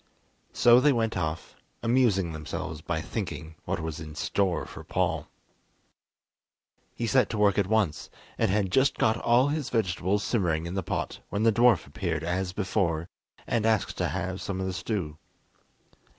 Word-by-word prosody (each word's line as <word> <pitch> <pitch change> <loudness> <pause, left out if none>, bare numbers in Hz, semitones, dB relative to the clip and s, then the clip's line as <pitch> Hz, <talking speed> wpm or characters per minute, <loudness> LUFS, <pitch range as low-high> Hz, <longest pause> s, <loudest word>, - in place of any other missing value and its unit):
So 120 0 +6
they 145 +3 +4
went 115 -3 0
off, 80 -2 -3 0.3
amusing 115 -8 +2
themselves 80 0 -5
by 80 0 -2
thinking 85 -4 -5
what - - -2
was 80 0 -4
in 75 -1 -8
store 90 +2 0
for - - -10
Paul. - - -1 1.7
He 120 - -2
set 130 +2 +3
to 110 - -3
work 105 -1 +3
at 100 - +1
once, 100 -7 0 0.3
and - - +3
had 95 -1 +1
just 135 +6 +3
got 110 0 +2
all 125 +5 +3
his 150 -2 -2
vegetables 100 -2 0
simmering 85 -8 0
in 85 - -5
the 95 - -1
pot - - -3
when 100 - -1
the 115 - +5
dwarf 115 -5 +4
appeared 80 +4 -3
as 90 +2 -1
before, 90 -4 -1 0.4
and 115 -2 0
asked 110 -3 +1
to - - +1
have 95 +1 -3
some 95 -1 -3
of 95 - -1
the 95 - -2
stew. 90 -4 -3
95 Hz, 165 wpm, -27 LUFS, 85-115 Hz, 1.7 s, So